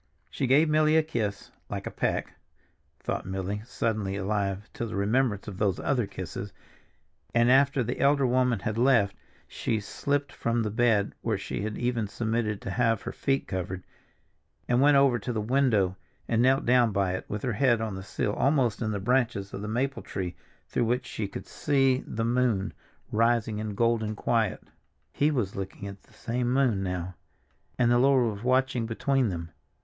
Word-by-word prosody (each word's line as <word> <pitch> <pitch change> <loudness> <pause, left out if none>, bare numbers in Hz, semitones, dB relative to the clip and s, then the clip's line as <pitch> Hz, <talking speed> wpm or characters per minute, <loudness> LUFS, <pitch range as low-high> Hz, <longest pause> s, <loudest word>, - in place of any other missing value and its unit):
She 135 - -1
gave 145 +5 +5
Milly 155 0 +3
a 160 - +6
little 155 +1 -15
kiss, 105 -6 -2 0.2
"like - - -4
a - - -4
peck," - - -1 0.7
thought - - -3
Milly, 95 +2 -3
suddenly 110 -4 -2
alive 100 +1 -2
to 115 - -3
the 110 - -6
remembrance 105 +1 +1
of 95 -3 -7
those 100 -4 +1
other 125 -6 0
kisses, 95 -6 -6 0.8
and 120 +1 +5
after 135 0 +4
the 120 - -3
elder 140 0 +4
woman 125 -1 +2
had 110 0 -2
left, 120 -6 +4 0.3
she 110 - -2
slipped 140 +7 -2
from 115 0 -1
the 105 - -2
bed 110 -3 +2
where 110 -3 0
she 95 - -4
had 105 0 -3
even 120 -3 -1
submitted 110 -1 -2
to 95 - -4
have 115 -2 +1
her - - -4
feet 135 0 -1
covered, 95 0 -4 0.8
and 125 +1 +3
went 145 0 +6
over 135 -3 +4
to 125 - -4
the 115 - -2
window 110 -5 +2 0.3
and 115 0 +2
knelt 130 +2 +3
down 120 -2 +4
by 100 -2 +1
it 95 - -4
with 105 0 -4
her 125 - 0
head 120 0 +3
on 110 -2 -3
the 95 - -6
sill 105 +1 -2
almost 130 -5 +1
in 110 - 0
the 105 -2 -2
branches 115 -3 0
of 95 - -5
the 105 - -4
maple 130 +5 -1
tree 90 -3 -4 0.3
through - - 0
which 125 +2 0
she 110 -4 -4
could 100 - -7
see 135 -3 +2
the 115 +1 -2
moon 120 -5 +1 0.4
rising 115 -1 +2
in 105 -1 -4
golden 110 -1 +1
quiet. 110 -1 0 0.5
He 145 - +2
was 120 -10 -1
looking 100 +1 -6
at 100 -1 -9
the - - -25
same 120 +1 -2
moon 125 -7 +2
now, 90 -1 -3 0.6
and 120 -1 +3
the 120 - +4
Lord 130 -4 +4
was 100 - -9
watching 130 -2 +1
between 130 +2 +1
them. 85 -2 -5
115 Hz, 185 wpm, -28 LUFS, 100-125 Hz, 0.8 s, a